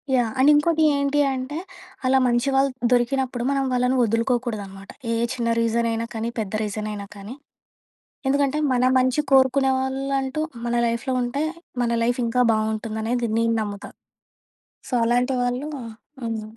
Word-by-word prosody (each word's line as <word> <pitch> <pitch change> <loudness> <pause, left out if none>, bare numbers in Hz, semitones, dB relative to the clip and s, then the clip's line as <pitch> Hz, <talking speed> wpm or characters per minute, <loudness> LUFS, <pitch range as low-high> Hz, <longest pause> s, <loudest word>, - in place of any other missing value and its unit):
Yeah! 240 -3 +2
And 275 +3 +6
ఇంకోటి 315 +2 +3
ఏంటి 280 +1 +1
అంటే 265 +3 -4 0.5
అలా 260 +1 +4
మంచి 240 +3 +1
వాళ్ళు 270 +1 +4 0.2
దొరికినప్పుడు 250 0 +1
మనం 275 -1 +1
వాళ్ళని 250 +1 +2
వదులుకోకూడదనమాట. 230 -4 -2 0.2
ఏ - - +1 0.2
చిన్న 235 -2 -2
రీజనయినా 230 0 0
కానీ, 225 +1 -2
పెద్ద 210 -2 -4
రీజనయినా 210 -1 -4
కానీ, 200 +3 -8 0.9
ఎందుకంటే 280 +1 +1
మన 250 - +2 0.2
మంచి 255 +3 +2
కోరుకునే 265 0 +4
వాళ్ళంటూ 270 +2 -1 0.2
మన 240 0 0
లైఫ్‌లో 235 +3 -1
ఉంటే 260 +5 -2 0.4
మన 235 - 0
లైఫ్ 245 +2 0
ఇంకా 240 +2 +1
బాగుంటుందానేది 220 +2 -1
నేను 230 0 +2
నమ్ముతా. 205 -1 -6 1.0
సో, - - -12
అలాంటి 245 +3 +1
వాళ్ళు 245 +4 -2 0.5
హ్మ్. 225 -2 -3
245 Hz, 135 wpm, -23 LUFS, 230-265 Hz, 1.0 s, And